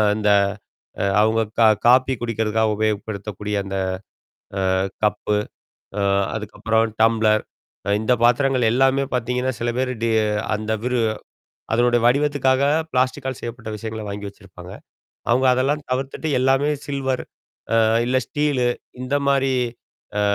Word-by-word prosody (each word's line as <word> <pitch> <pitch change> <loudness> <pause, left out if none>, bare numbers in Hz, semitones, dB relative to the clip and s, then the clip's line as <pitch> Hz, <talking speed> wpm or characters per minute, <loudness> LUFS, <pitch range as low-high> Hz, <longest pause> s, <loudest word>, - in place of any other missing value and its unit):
அந்த, 105 -1 +1 0.7
அ - - +1 0.2
அவங்க 110 +1 +3 0.2
கா 115 - +7 0.2
காபி 130 +2 +5
குடிக்கிறதுக்காக 110 -1 0
உபயோகப்படுத்தக்கூடிய, 105 -1 -3
அந்த 95 0 -5 1.1
அ 95 - -1 0.2
கப்பு. 105 0 +1 0.6
அ - - +1 0.3
அதுக்கப்புறம் 110 +1 -1
டம்ப்ளர். 110 -1 +3 0.4
அ - - 0
இந்த 110 +3 +2
பாத்திரங்கள் 125 0 +3
எல்லாமே 135 +2 +3
பாத்தீங்கன்னா, 125 +2 -1
சில 120 - -1
பேரு 130 0 0
டி 115 - +2 0.4
அந்த 110 +1 -4
விரு 125 -1 +1 0.7
அதனுடைய 120 +1 +3
வடிவத்துக்காக 135 0 +2 0.3
பிளாஸ்டிக்கால் 130 0 0
செய்யப்பட்ட 115 -1 -6
விஷயங்கள 110 0 -6
வாங்கி 100 0 -5
வச்சிருப்பாங்க. 95 -2 -13 0.6
அவங்க 130 +3 +3
அதெல்லாம் 140 +4 0
தவிர்த்துட்டு 135 +4 -2
எல்லாமே 135 +3 +2 0.2
சில்வர். 135 -2 -2 0.5
அ - - +4 0.3
இல்ல 130 +1 +1
ஸ்டீலு 145 -4 0 0.3
இந்த 130 +2 -2
மாரி, 135 -1 +2 0.6
அ - - +2
120 Hz, 120 wpm, -22 LUFS, 110-130 Hz, 1.1 s, கா